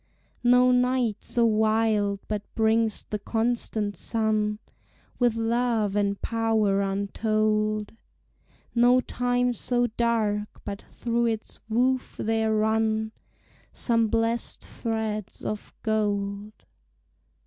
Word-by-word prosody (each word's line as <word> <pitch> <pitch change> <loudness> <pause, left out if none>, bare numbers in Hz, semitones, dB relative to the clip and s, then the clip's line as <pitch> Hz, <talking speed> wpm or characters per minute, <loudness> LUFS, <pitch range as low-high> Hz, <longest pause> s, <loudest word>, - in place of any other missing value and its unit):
No 250 +1 +5
night 250 -3 +2
so 235 -1 0
wild 215 -2 +2
but 210 -1 -2
brings 220 -1 +2
the 210 - -4
constant 225 -2 -1
sun 215 -2 0 0.6
With 240 -2 +3
love 230 -2 0
and 200 -1 0
power 220 -3 +1
untold; 215 +2 0 0.8
No 245 +1 +5
time 245 0 0
so 245 +2 0
dark 220 -3 -1
but 200 -1 -5
through 235 0 -1
its 220 -1 -4
woof 255 +3 0
there 220 0 0
run 220 0 +1 0.6
Some 230 -2 +1
blessèd 230 +1 0
threads 220 -3 -4
of 210 -1 -4
gold. 205 -1 -1
220 Hz, 100 wpm, -26 LUFS, 210-235 Hz, 0.8 s, No